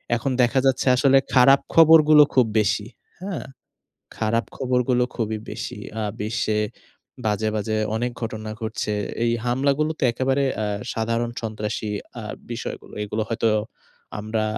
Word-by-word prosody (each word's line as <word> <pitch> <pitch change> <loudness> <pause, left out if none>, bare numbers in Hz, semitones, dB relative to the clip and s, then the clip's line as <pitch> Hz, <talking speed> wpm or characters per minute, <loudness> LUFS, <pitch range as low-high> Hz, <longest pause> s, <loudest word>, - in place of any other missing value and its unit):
এখন 120 +4 -2
দেখা 125 +2 +3
যাচ্ছে 135 0 +2
আসলে 135 +1 +4 0.2
খারাপ 135 +2 +7
খবরগুলো 155 -2 +8
খুব 130 -2 +5
বেশি। 105 0 0 0.3
হ্যাঁ? 190 -2 -5 0.7
খারাপ 115 +2 0
খবরগুলো 125 -1 +1
খুবই 110 -2 -2
বেশি। - - -6 0.2
আ - - -1 0.2
বিশ্বে 110 0 -1 0.7
বাজে, 110 0 0
বাজে 110 +1 -1 0.2
অনেক 120 +2 -1
ঘটনা 110 -1 -4
ঘটছে। 110 -1 -3 0.3
এই 115 - +2
হামলাগুলো 140 +5 +1
তো - - -13
একেবারে 135 +3 +1
অ্যা 110 - -1 0.3
সাধারণ 115 +1 -1
সন্ত্রাসী 110 -1 -3 0.3
আ - - -8 0.3
বিষয়গুলো। - - -6
এগুলো 105 +1 -2
হয়তো 115 0 +1 0.7
আমরা 110 +1 -2
115 Hz, 130 wpm, -23 LUFS, 110-135 Hz, 0.7 s, খবরগুলো